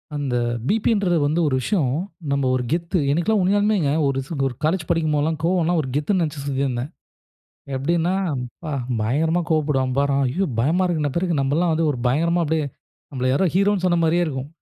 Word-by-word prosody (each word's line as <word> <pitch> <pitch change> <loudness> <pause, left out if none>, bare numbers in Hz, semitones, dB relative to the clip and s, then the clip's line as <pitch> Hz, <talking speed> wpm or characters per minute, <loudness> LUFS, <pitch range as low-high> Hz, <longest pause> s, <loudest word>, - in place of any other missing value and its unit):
அந்த 140 -4 -2 0.3
பிபின்றது 205 -5 +2
வந்து 155 +4 +1
ஒரு 130 - +1
விஷயம். 150 - 0 0.4
நம்ம 140 -1 +1
ஒரு 125 - -1
கெத்து 170 +1 0
எனிக்கெல்லாம் 185 +7 +1
உண்மையாலுமேங்க. 200 -4 +2 0.2
ஒரு 135 -1 0 0.3
ஒரு 125 - -6
காலேஜ் 160 +2 0
படிக்கும்போதெல்லாம் 155 -1 +1
கோவம்லாம் 175 -1 +2
ஒரு 130 - -6
கெத்துனு 175 +6 +1
நினைச்சு 150 -3 -3
சுத்திந்தேன். 135 -1 -2 0.9
எப்படினா 170 +6 0 0.3
ப்பா! 150 +6 -8 0.3
பயங்கரமா 160 +10 +1
கோவப்படுவான் 145 -5 +1
பாரு 140 0 +2
அவன். 140 -1 +2
ஐயோ! 180 +10 -1
பயமா 165 +10 +2
இருக்குன்ன 155 -4 0
பிறருக்கு, 170 -3 0
நம்பல்லாம் 160 +5 +1
வந்து 160 0 +1
ஒரு 125 - -6
பயங்கரமா 170 +7 +2
அப்படியே, 155 -1 0 0.4
நம்மள 130 -2 -2
யாரோ 180 +8 +2
ஹீரோனு 200 0 +2
சொன்ன 175 -1 +2
மாரியே 170 +2 +2
இருக்கும். 135 -3 -4
160 Hz, 165 wpm, -22 LUFS, 140-175 Hz, 0.9 s, பிபின்றது